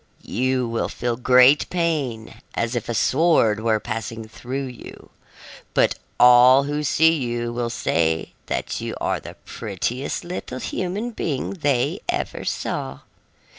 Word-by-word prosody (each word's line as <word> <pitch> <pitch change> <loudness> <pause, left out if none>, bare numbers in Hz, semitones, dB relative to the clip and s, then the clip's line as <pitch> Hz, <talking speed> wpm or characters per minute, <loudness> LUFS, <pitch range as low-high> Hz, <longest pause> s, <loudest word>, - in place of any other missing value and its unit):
"You 130 0 0
will 115 0 -2
feel 120 -1 -2
great 125 +3 +5
pain, 150 -10 -2
as 115 +1 -1
if 120 - -3
a - - 0
sword 130 -7 +3
were 110 -1 +1
passing 115 0 -5
through 130 +5 -5
you. 125 -2 -11 0.6
But - - +4 0.3
all 125 +2 +7
who 145 +1 -2
see 160 +3 +4
you 120 -5 -2
will 120 0 -2
say 80 -7 0
that - - -3
you - - -4
are - - -1
the - - -10
prettiest 115 - -3
little 175 -7 -6
human 190 - -3
being 150 - -3
they 145 -9 0
ever - - -2
saw. 65 0 -3
125 Hz, 135 wpm, -22 LUFS, 115-145 Hz, 0.6 s, all